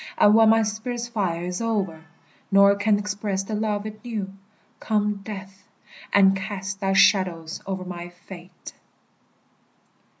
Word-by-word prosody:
And 205 - +6
when 225 0 +6
my 225 0 +5
spirit's 235 +3 -4
fire 190 -8 -2
is 180 +4 -4
o'er, 195 -8 -2 0.5
Nor 200 0 +6
can 205 +1 +2
express 205 -1 -3
the 215 - -6
love 210 -1 -1
it 215 +2 -8
knew, 210 -5 -4 0.5
Come, 210 -1 0
Death, 195 -1 -9 0.4
and 195 -1 +5
cast 195 0 -5
thy 195 -1 0
shadows 180 -5 +2
o'er 190 -1 -4
my 175 -1 -7
fate! 175 0 -12
200 Hz, 135 wpm, -24 LUFS, 190-215 Hz, 0.5 s, And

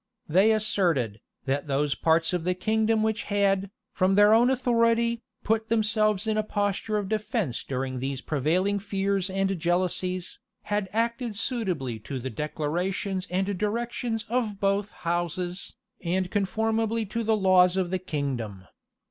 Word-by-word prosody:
They 190 +8 +5
asserted, 170 - +1 0.2
that 140 +2 -1
those 140 +1 +1
parts 165 +2 +2
of 175 -2 -1
the 180 +1 0
kingdom 220 +3 +1
which 220 0 -1
had, 200 -1 +1 0.2
from 190 -1 +2
their 205 +1 +7
own 235 +3 +5
authority, 235 -2 +2 0.2
put 225 +1 0
themselves 215 -2 +2
in 220 -1 0
a - - +3
posture 205 +1 -1
of 205 -2 -2
defence 215 - -1
during 130 -1 -3
these 135 +1 -3
prevailing 170 +9 0
fears 195 -1 -1
and 195 -1 0
jealousies, 180 +1 -1 0.2
had 205 -2 -1
acted 230 +1 -1
suitably 180 - -2
to 130 +5 -6
the 130 +1 -4
declarations 175 - -2
and 190 +3 0
directions 225 +1 -2
of 225 -4 -1
both 200 +1 +1 0.2
houses, 175 +2 -2 0.3
and 180 +1 -1
conformably 220 +3 0
to 230 +3 -3
the 220 0 +2
laws 185 -2 +5
of 180 -2 0
the 185 - 0
kingdom. 130 - -4
195 Hz, 145 wpm, -27 LUFS, 175-220 Hz, 0.3 s, their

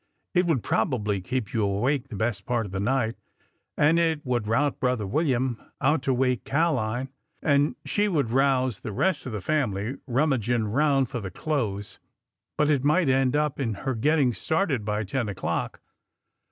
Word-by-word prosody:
'' - - -51
It 180 -1 +3
would 145 -9 +1
probably 105 -4 0
keep 125 +1 -3
you 110 - +1
awake 120 +8 0
the 120 - -8
best 100 -3 -2
part 120 -2 0
of 100 - -8
the 95 - -3
night, 115 +1 0 0.6
and 155 +3 +4
it 160 -3 0
would 120 -4 -1
rout 140 +6 +1
brother 125 -5 0
William 130 - 0 0.2
out 145 +1 +2
to 135 - 0
wake 125 -1 +1
Ca'line, 135 -5 0 0.3
and 145 0 +3
she 210 0 +1
would 145 - 0
rouse 130 -3 +2
the 110 - -6
rest 185 - 0
of - - -4
the 105 -3 -4
family 125 -3 -1
rummaging 120 -4 +1
around 135 +5 +2
for 125 - -5
the 95 - -5
clothes,— 105 - -3 0.6
but 150 - +3
it 140 -3 +1
might 150 +1 +3
end 130 0 +2 0.2
in 120 -6 -1
her 130 +7 -3
getting 135 +2 +2
started 160 - 0
by 105 +1 -1
ten 105 +3 -2
o'clock 100 - -3
130 Hz, 175 wpm, -26 LUFS, 110-145 Hz, 0.6 s, and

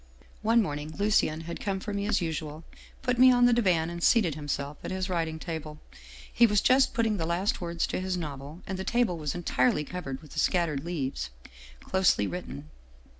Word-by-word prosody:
" - - -27
One 230 -1 +5
morning 150 -2 -5
Lucien 200 -6 +2
had 170 +1 -6
come 195 -2 -2
for 205 +2 -5
me 200 0 -2
as 215 - +1
usual, 155 -1 -4 0.4
put 250 -2 0
me 255 0 +8
on 245 -1 +5
the 245 - +5
divan, 175 -8 +2
and 170 0 -6
seated 190 -5 +4
himself 145 -1 -4
at - - -4
his 185 +1 -2
writing 165 -2 -1
table. 155 -2 -6 0.5
He 235 - +6
was 210 -1 +3
just 260 +4 +3
putting 225 -3 +1
the 165 - -2
last 190 +8 0
words 170 -1 -1
to - - -3
his 185 0 -2
novel, 150 0 -7
and 190 -1 -4
the - - -2
table 230 -6 +1
was 150 +1 -3
entirely 150 -4 +1
covered 150 -4 -6
with 150 - -15
the - - -4
scattered 160 -6 +1
leaves, 135 - -3 0.5
closely 190 - +2
writ 180 - -5
ten. 70 +2 -9
170 Hz, 205 wpm, -28 LUFS, 155-200 Hz, 0.5 s, me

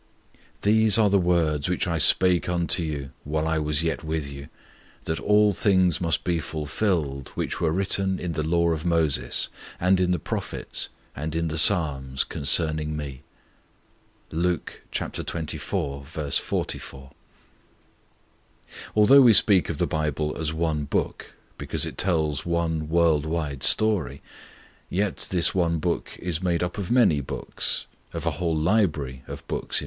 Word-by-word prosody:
'_These 110 0 +4
are 105 -3 +3
the 100 - +4
words 85 -4 +1
which 90 - 0
I 85 -2 -1
spake 90 +2 +3
unto 85 +1 +2
you, 70 -5 -4
while 80 +2 -2
I 80 0 +1
was 75 0 -1
yet 85 0 -2
with 80 -2 -3
you, 70 +1 -9 0.5
that 80 - -2
all 105 0 +3
things 95 -3 +2
must 85 -2 0
be 85 -2 0
fulfilled, 75 -3 -2
which - - -3
were 85 - +2
written 95 +1 0
in 90 -1 -4
the 80 - -2
law 85 +2 +1
of 80 -1 -2
Moses, 80 -7 +1 0.3
and 90 +1 +3
in 90 -1 +1
the 90 - +2
prophets, - - -4 0.3
and 75 +2 -4
in 85 0 -1
the 80 - -3
Psalms, 70 -7 +2
concerning 75 +1 +1
Me._' 70 -3 -6 1.1
(Luke 85 +1 -2
xxiv. 80 -2 -4
44.) 70 -1 -3 1.8
Although 125 +7 +7
we 120 -3 +7
speak 95 -1 +5
of 85 - -3
the - - +1
Bible 75 -1 -2
as 80 -1 -3
one 80 -2 -1
Book, - - -3 0.2
because - - -1
it - - -7
tells 80 -7 +1
one 80 -2 -1
world 80 -3 +2
wide 75 -4 -3
story, 90 - +3 0.7
yet 100 +1 -1
this 90 -2 +1
one 85 -3 +1
Book 85 +2 -3
is 85 -1 -3
made 90 -2 0
up 90 +3 -4
of 95 - -4
many 120 - +4
books 65 - -3 0.3
of - - -5
a - - +1
whole 85 -3 -1
library 80 - 0
of - - -9
books - - -4
in - - +4
fact. - - +3
80 Hz, 155 wpm, -25 LUFS, 75-90 Hz, 1.8 s, Although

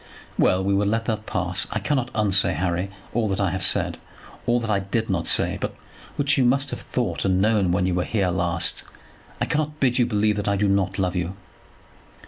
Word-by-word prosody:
"Well; 95 +1 +3
we 100 +1 +1
will 100 +1 +2
let 115 +2 0
that 110 -2 -3
pass. 90 +2 -1
I - - -1
cannot 125 +3 0
unsay, 100 -3 +3
Harry, 90 +3 -1 0.2
all 115 -1 +1
that 95 - -1
I 95 -3 +1
have 95 - -3
said; - - +2 0.5
all 120 0 +3
that 115 -2 -4
I 100 - +2
did 100 +3 -2
not 85 -3 -1
say, - - +1
but - - -3 0.4
which 145 0 +2
you - - +4
must 135 +2 +2
have - - -5
thought - - -2
and 95 -1 +2
known 105 -3 +2
when 90 +1 +1
you 90 - +1
were 90 0 +1
here 100 -3 0
last. 85 -1 0 0.6
I - - +1
cannot 150 0 -2
bid 125 -2 +2
you 120 - +3
believe 105 -2 +1
that 105 - -3
I 100 - +2
do 100 +1 +1
not 100 -1 +1
love 95 -2 0
you." 90 +1 -2
100 Hz, 220 wpm, -24 LUFS, 95-115 Hz, 0.6 s, you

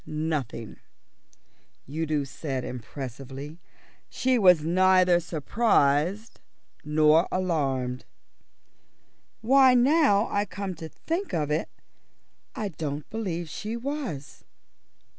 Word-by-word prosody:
"Nothing," 150 -8 -4 1.1
said 135 - -12
Udo 145 -3 -2
impressively. 135 +4 -8 0.5
"She 255 -1 +1
was 180 -6 +6
neither 185 +1 +4
surprised 175 - +1 0.4
nor 155 +2 +4
alarmed." 135 -9 -1 1.4
"Why, 260 +2 +5
now 250 -5 +4
I 205 0 +1
come 195 -1 -5
to 160 0 -7
think 340 - -4
of 150 -2 -1
it, 155 +2 -1 0.9
I 210 -2 -3
don't 150 -4 -5
believe 180 -7 -3
she 215 +8 -5
was." 235 - -5
165 Hz, 90 wpm, -26 LUFS, 145-210 Hz, 1.4 s, was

